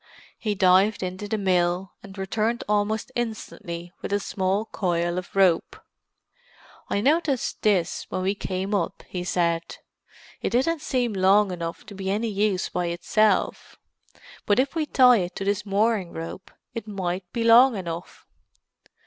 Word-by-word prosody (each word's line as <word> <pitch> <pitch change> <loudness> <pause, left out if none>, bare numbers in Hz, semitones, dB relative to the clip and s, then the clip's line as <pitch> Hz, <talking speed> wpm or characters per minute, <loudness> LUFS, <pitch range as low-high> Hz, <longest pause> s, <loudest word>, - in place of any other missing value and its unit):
He 210 -2 -1
dived 190 +2 +4
into 185 +3 -4
the 220 - -1
mill, 180 -1 +1
and 200 0 -12
returned 215 +5 -1
almost 210 +3 0
instantly 200 -7 -5
with - - -5
a 205 - +2
small 195 +2 -1
coil 175 -4 -1
of 185 - -11
rope. 185 -4 +2 1.1
"I 200 - 0
noticed 285 -1 +1
this 185 -5 +1
when 185 - -2
we 195 +1 +1
came 190 0 -3
up," 190 -5 -1
he 180 -1 -4
said. 170 -2 -1 0.6
"It - - 0
didn't 285 +6 +1
seem 250 -6 0
long 195 +1 +4
enough 170 -2 -5
to - - -10
be 190 -1 -4
any 215 +4 0
use 200 -2 0
by 180 -1 -2
itself, 185 +5 0 0.7
but 205 - +3
if 265 +2 +1
we 320 -2 -1
tie 250 -4 +6
it 180 -3 -3
to 195 - -4
this 205 +1 -1
mooring 200 -2 +1
rope 165 +3 -7 0.2
it 225 -1 -6
might 185 -3 -4
be 230 - -2
long 235 +1 +7
enough." 170 -2 -7
195 Hz, 155 wpm, -25 LUFS, 180-220 Hz, 1.1 s, long